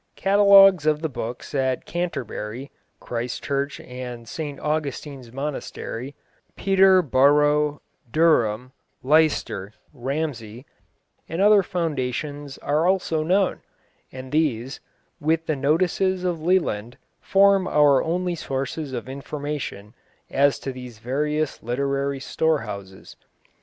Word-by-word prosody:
Catalogues 195 -4 +6
of 150 0 +2
the 160 - 0
books 120 +2 -6
at 130 -2 0
Canterbury 135 - -4 0.3
(Christ 120 0 -4
Church 140 0 -2
and 125 -2 -8
St 145 +2 -5
Augustine's 145 -4 -4
monastery), 135 -1 -5 0.4
Peterborough, 150 -6 +3 0.3
Durham, 130 -7 +2 0.3
Leicester, 140 -9 +1 0.2
Ramsey, 130 -3 -4 0.6
and 165 - -4
other 205 +1 +6
foundations 145 -5 -3
are 150 +4 0
also 185 -4 +1
known, 185 +4 +1 0.5
and 130 0 -9
these, 135 -4 0 0.4
with 160 +2 0
the 155 - 0
notices 180 +6 +1
of 175 -3 -1
Leland, 140 - 0 0.2
form 195 -1 +4
our 145 -5 +4
only 180 +2 -1
sources 140 -1 -4
of 120 -1 -5
information 140 -6 -6 0.4
as 140 +1 +3
to 135 - -5
these 125 -3 -10
various 150 +6 -2
literary 140 +3 -1
storehouses. 105 -12 -3
145 Hz, 105 wpm, -23 LUFS, 130-160 Hz, 0.6 s, Catalogues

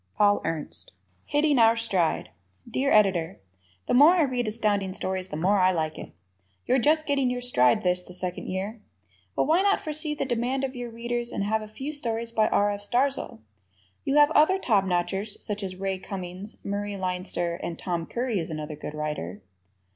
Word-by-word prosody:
Paul 205 -1 +4
Ernst. 150 - -5 0.3
Hitting 295 -2 +3
Our 225 0 +6
Stride 190 - 0 0.4
Dear 265 +4 0
Editor: 190 -4 +3 0.5
The - - +1
more 290 +7 +8
I 345 - +4
read 250 -4 -1
Astounding 210 -3 0
Stories, 185 0 -3
the 150 - -5
more 190 +5 +3
I 185 0 +5
like 160 -3 -2
it. - - -9 0.5
You're 260 - +3
just 310 +5 +3
getting 275 -3 +1
your 250 0 -2
stride 125 - +3
this, 180 0 +2
the 180 - -14
second 180 -1 -4
year. 200 +4 -4 0.5
But - - +2
why 330 +4 +3
not 400 0 +3
foresee 305 0 -2
the 290 - -2
demand 255 +2 -1
of 265 0 -3
your 245 -1 -5
Readers 235 +1 -3
and - - -2
have 220 +2 0
a 215 - -7
few 265 +8 -6
stories 230 -5 -3
by 220 -2 +3
R. 205 0 +2
F. 205 0 -5
Starzl? 245 - -1 0.6
You 275 - 0
have 295 +1 +6
other 320 +5 +5
top 210 - +2
notchers 190 +3 -1
such 210 0 -4
as 190 -2 -5
Ray 190 0 -2
Cummings, 185 +1 -7
Murray 205 0 -3
Leinster; 180 -2 -2
and 170 - -4
Tom 170 -3 -3
Curry 240 -4 -1
is 165 - -4
another 155 -1 -5
good 150 0 -7
writer. 105 - -4
205 Hz, 190 wpm, -26 LUFS, 180-250 Hz, 0.6 s, more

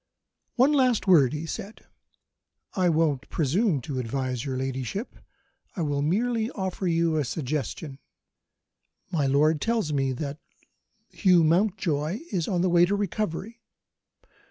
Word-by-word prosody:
"One 265 +4 +4
last 255 -5 +2
word!" 155 -10 +5
he 150 +2 -4
said. 200 +6 -7 0.9
"I 185 -2 +2
won't 155 -4 +1
presume 165 - +1
to 130 +1 -4
advise 125 0 -3
your 135 -2 -3
ladyship; 130 - -4 0.6
I 175 - -2
will 145 -2 -1
merely 220 +8 0
offer 190 -5 -3
a 165 -2 +1
suggestion. 140 +1 -4 1.1
My 150 -5 +1
lord 150 +3 +3
tells 225 -9 0
me 135 -2 +1
that 140 +3 -5 0.7
Hugh 180 -4 +4
Mountjoy 170 - +1
is 180 -6 -1
on 180 -3 0
the 185 - +2
way 175 0 +6
to 200 +3 0
recovery. 205 +2 -3
165 Hz, 130 wpm, -26 LUFS, 140-200 Hz, 1.1 s, way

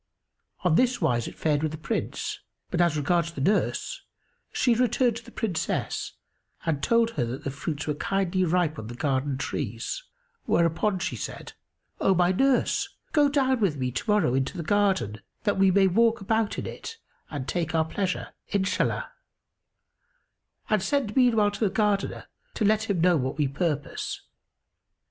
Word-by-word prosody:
On 180 -3 +3
this 250 +6 +3
wise 120 - +1
fared 150 -2 0
it - - -5
with 155 -1 -1
the - - -5
Prince; 155 - -3 0.3
but 175 - +1
as 170 -3 +3
regards 170 +3 +1
the 145 - -7
nurse, 200 +10 0 0.5
she 245 - +3
returned 240 0 +2
to 235 - -9
the - - -13
Princess 175 -7 -2 0.5
and 155 -4 0
told 230 +4 +3
her 135 - -1
that 125 +3 -5
the 140 - -2
fruits 150 +2 -4
were 150 - 0
kindly 185 +3 0
ripe 170 -3 +1
on 110 - -7
the 120 - -7
garden 135 0 0
trees; 130 - -3 0.4
whereupon 170 +4 +2
she 185 - -2
said, - - -6 0.5
"O 190 - +3
my 180 0 +4
nurse, 265 +7 +2 0.2
go 290 -2 +4
down 265 -3 +2
with 185 -9 +1
me 125 -1 -1
to 120 - -4
morrow 210 -12 +3
into 135 +7 -1
the 170 - -3
garden, 155 - +1 0.2
that 205 -3 +1
we 195 0 +6
may 195 +1 +5
walk 225 +5 +3
about 220 +2 0
in - - -3
it 455 - -7 0.3
and 140 -3 -5
take 170 -2 -1
our 160 -1 +3
pleasure,—Inshallah; 190 +2 -1 1.6
and 215 -3 +2
send 250 -2 0
meanwhile 225 -5 +4
to 205 - -7
the 215 - +2
Gardener, 205 0 0 0.3
to 215 - 0
let 215 +1 +2
him 185 -5 +1
know 175 -1 +5
what 130 0 -2
we 150 -2 +2
purpose." 145 0 -2
180 Hz, 165 wpm, -26 LUFS, 150-215 Hz, 1.6 s, we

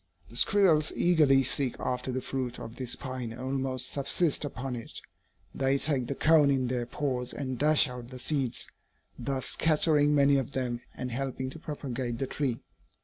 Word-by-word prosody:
The - - -12
squirrels 175 -7 +4
eagerly 150 -6 +4
seek 130 0 -1
after 125 +1 -2
the 130 0 -3
fruit 125 -2 -3
of 115 - -8
this 125 -2 -2
pine 130 -3 -5
and 115 - -9
almost 130 0 -2
subsist 145 +3 +1
upon 135 -2 -4
it. 115 - -5 0.5
They 135 0 +1
take 135 -4 0
the 140 - -2
cone 155 -2 +5
in 135 -2 +2
their 120 -1 -2
paws 125 -2 -2
and 130 -3 -4
dash 150 0 +4
out 125 -1 -7
the 130 +1 -9
seeds, 135 -2 -1 0.5
thus 135 -2 -2
scattering 150 -2 +4
many 140 0 +5
of 135 +1 -2
them 120 -2 -2
and 125 -1 -4
helping 130 +1 -3
to 160 - -9
propagate 130 -6 -4
the 135 - -1
tree. 130 -3 -2
135 Hz, 175 wpm, -29 LUFS, 125-145 Hz, 0.5 s, cone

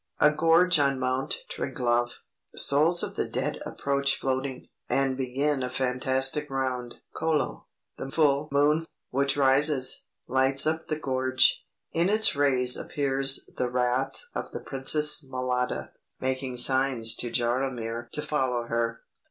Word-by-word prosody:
A 150 - +6
gorge 165 +2 +4
on 140 -1 +2
Mount 130 +1 -1
Triglav. 120 -1 -1 0.5
Souls 155 +5 +3
of - - -4
the - - -1
dead - - -3
approach 140 0 0
floating, 130 0 -3 0.2
and 135 -1 +1
begin 135 +2 -1
a 125 - -2
fantastic 130 +3 -1
round 130 -2 -3 0.2
(Kolo). 160 -3 -1 0.3
The - - -6
full 145 0 +2
moon, 150 +3 +2 0.2
which 140 +2 +1
rises, 135 0 +2 0.2
lights 130 +2 +2
up 160 +1 -1
the 155 - -1
gorge; 130 -2 +2 0.3
in 170 +3 +1
its 215 -3 +3
rays 130 -3 +3
appears 135 -1 0
the 125 - 0
wraith 125 - -1
of - - -4
the - - -6
princess 150 +3 +2
Mlada, 130 -1 -2 0.3
making 130 -1 -3
signs 130 -2 +2
to 120 - -2
Jaromir 120 -1 -2
to 150 - -2
follow 130 -5 -1
her. 115 0 -2
135 Hz, 135 wpm, -27 LUFS, 125-145 Hz, 0.5 s, A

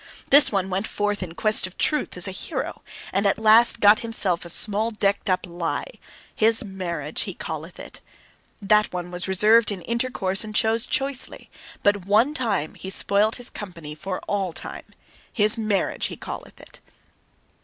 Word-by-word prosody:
This 280 -1 +7
one 195 -2 -1
went 195 +4 -2
forth 205 -1 -2
in 170 -3 -6
quest 215 -1 +3
of 185 - -15
truth 300 - -1
as - - +5
a - - -4
hero, - - -5 0.3
and 200 +1 +1
at 195 - +1
last 220 +2 +5
got 210 0 +6
for - - -7
himself 200 -6 +1
a 170 - -8
small 210 +5 +2
decked 200 -2 -1
up 185 - 0
lie: 175 - -5 0.4
his 225 +1 +3
marriage 170 -7 -5
he - - -7
calleth - - -7
it. - - -11 0.6
That 210 +1 +2
one 180 -1 -6
was 180 +1 -1
reserved 210 +4 +4
in 190 -4 -6
intercourse 230 -5 -1
and 215 0 -8
chose 225 +1 +2
choicely. 270 -1 -2 0.3
But 205 -2 +1
one 225 +8 +3
time 210 - -2
he 190 - -9
spoilt 200 +3 +2
his 245 0 -2
company 170 -7 -9
for 185 +5 -5
all 195 -4 -3
time: 175 - -8 0.5
his 210 -1 +3
marriage 210 -3 -1
he - - -9
calleth - - -9
it. - - -15
205 Hz, 175 wpm, -23 LUFS, 185-220 Hz, 0.6 s, This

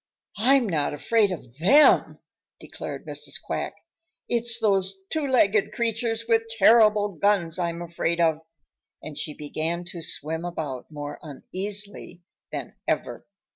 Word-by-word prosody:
"I'm 255 +2 +4
not 150 -5 0
afraid 210 +6 +2
of 130 -8 -8
THEM," 280 - +5 0.4
declared - - -8
Mrs. - - -2
Quack. - - -4 0.5
"It's 235 -1 0
those 195 -3 +1 0.2
two 310 -3 0
legged 215 -6 +3
creatures 230 0 -1
with 225 -1 +2
terrible 215 -1 +5
guns 180 -2 +1
I'm 170 -1 -2
afraid 170 0 -2
of," 160 -2 +2 0.6
and 155 - -8
she 150 0 -5
began 160 +4 -3
to 175 -4 -7
swim 160 +1 -3
about 155 -7 -5
more 145 -1 -7
uneasily 195 +5 -3 0.3
than - - -6
ever. - - -2
190 Hz, 130 wpm, -25 LUFS, 160-225 Hz, 0.6 s, THEM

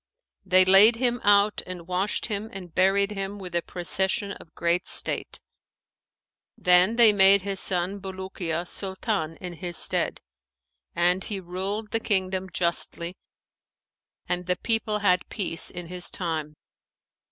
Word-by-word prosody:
They 185 -1 +5
laid 195 +5 +7
him 245 0 -1
out 205 0 +3
and 180 -2 -8
washed 185 +3 -1
him 215 0 -4
and 180 -4 -10
buried 195 +2 +2
him 195 0 -5
with 185 -3 -9
a 170 - +1
procession 190 +4 -1
of 165 -5 -12
great 170 +2 0
state. - - -1 1.2
Then 180 +4 +4
they 230 -3 +6
made 195 -1 +5
his 195 -1 -4
son 185 +2 0
Bulukiya 190 -3 -5
Sultan 190 -4 -3
in 180 -1 -7
his 175 0 -5
stead; - - +1 0.8
and 180 +2 +2
he 205 -2 -4
ruled 190 +4 -4
the 225 - 0
kingdom 190 -3 -1
justly 170 0 -1 1.1
and 180 0 -3
the 180 - +1
people 225 -1 -1
had 180 -1 +2
peace 180 -6 -1
in 175 -1 -7
his 180 +1 +1
time. 155 -4 -4
190 Hz, 140 wpm, -25 LUFS, 180-200 Hz, 1.2 s, laid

